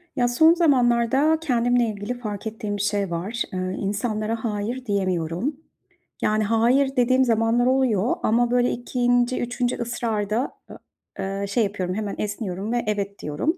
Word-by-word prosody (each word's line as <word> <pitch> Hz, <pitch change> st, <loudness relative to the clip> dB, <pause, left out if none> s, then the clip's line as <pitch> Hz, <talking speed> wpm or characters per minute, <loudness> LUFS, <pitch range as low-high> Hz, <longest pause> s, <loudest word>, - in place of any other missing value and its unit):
Ya 245 Hz, -, +2 dB
son 315 Hz, +7 st, +5 dB
zamanlarda 270 Hz, -1 st, +3 dB
kendimle 245 Hz, -4 st, +2 dB
ilgili 205 Hz, +3 st, -4 dB
fark 210 Hz, -3 st, -5 dB
ettiğim 215 Hz, -2 st, -4 dB
bir -, -, -3 dB
şey 200 Hz, -3 st, -1 dB
var. 200 Hz, +8 st, -2 dB
Eee, 185 Hz, -, -2 dB, 0.2 s
insanlara 215 Hz, +2 st, -2 dB
"hayır" 230 Hz, +3 st, -3 dB
diyemiyorum. 185 Hz, -, -1 dB, 0.7 s
Yani 215 Hz, 0 st, +2 dB
"hayır" 240 Hz, +6 st, +2 dB
dediğim 255 Hz, +1 st, +3 dB
zamanlar 230 Hz, +1 st, +2 dB
oluyor 255 Hz, -4 st, +2 dB
ama 240 Hz, +2 st, +2 dB
böyle 245 Hz, 0 st, +3 dB
2. 245 Hz, 0 st, 0 dB
3. 245 Hz, 0 st, -1 dB
ısrarda, 230 Hz, -1 st, -2 dB
eee, -, -, -10 dB, 0.4 s
eee, 195 Hz, +1 st, -3 dB
şey 225 Hz, +4 st, +1 dB
yapıyorum, 190 Hz, -3 st, -2 dB
hemen 210 Hz, -1 st, -3 dB
esniyorum 205 Hz, -1 st, -4 dB
ve 240 Hz, 0 st, 0 dB
"evet" 200 Hz, -1 st, -2 dB
diyorum. 220 Hz, -, -2 dB
230 Hz, 145 wpm, -23 LUFS, 205-245 Hz, 0.7 s, son